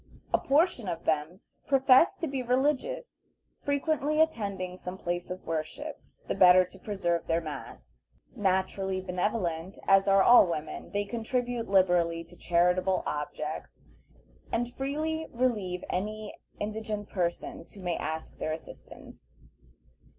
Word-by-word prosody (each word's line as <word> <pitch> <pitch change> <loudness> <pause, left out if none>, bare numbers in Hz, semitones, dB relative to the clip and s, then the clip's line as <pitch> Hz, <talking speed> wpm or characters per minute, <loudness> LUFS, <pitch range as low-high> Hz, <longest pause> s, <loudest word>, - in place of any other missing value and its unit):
A - - +5
portion 285 - +2
of 170 -2 -3
them 160 +4 0 0.3
profess 270 +2 +5
to - - -3
be 270 -2 -2
religious, 290 - -1 0.4
frequently 295 +1 0
attending 200 -12 0
some 185 0 -7
place 175 -1 -3
of 185 0 -6
worship 160 -1 -4 0.3
the - - 0
better 185 0 +7
to 185 +2 -16
preserve 175 -5 -1
their 165 0 +2
mask. 145 - -9 0.4
Naturally 190 0 0
benevolent, 180 -2 -2
as 195 0 +5
are 195 0 +6
all 240 -5 +8
women, 155 -2 -4
they 205 0 -1
contribute 240 +1 -2
liberally 175 -3 +3
to 170 +1 -17
charitable 180 +2 +2
objects, 150 +1 -5 0.7
and 240 +1 -1
freely 310 +4 -2
relieve 210 -8 -1
any 215 +3 -3 0.3
indigent 210 0 -3
persons 175 -2 -3
who 200 - -11
may 175 -2 -1
ask 160 0 -5
their 155 - -1
assistance. 65 - -12
190 Hz, 130 wpm, -29 LUFS, 175-245 Hz, 0.7 s, all